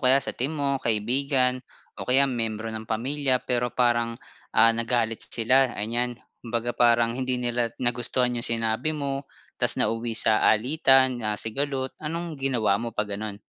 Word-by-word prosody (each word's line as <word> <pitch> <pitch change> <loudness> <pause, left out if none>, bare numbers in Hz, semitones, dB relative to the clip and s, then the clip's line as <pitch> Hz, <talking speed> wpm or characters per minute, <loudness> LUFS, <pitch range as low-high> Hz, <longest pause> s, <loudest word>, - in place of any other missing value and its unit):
kaya 130 +1 +6
sa - - -4
team 140 +6 -1
mo, 140 -2 -1
kaibigan 125 +3 +1 0.4
o - - -7
kaya 135 +2 +5
miyembro 115 -3 -2
ng 110 0 -7
pamilya, 130 +4 0
pero 125 0 0
parang, 120 -1 +1 0.4
ah, 115 0 +7
nagalit 115 -1 -1
sila, 130 +2 +2
anyan. 120 +3 -2 0.3
Kumbaga, 120 +1 -3
parang 120 -1 +3
hindi 130 0 -1
nila 120 -1 -1
nagustuhan 125 0 0
'yong - - -1
sinabi 115 +6 -1
mo 140 -1 -4 0.3
ta's - - +2
nauwi 115 0 -1
sa 110 -1 +3
alitan 130 +1 +3
na 105 -1 -1
sigalot. 130 +3 -2
Anong 165 +2 -4
ginawa 120 -7 +1
mo 115 0 -4
'pag 105 - 0
gano'n? 105 0 -5
120 Hz, 155 wpm, -25 LUFS, 115-130 Hz, 0.4 s, ah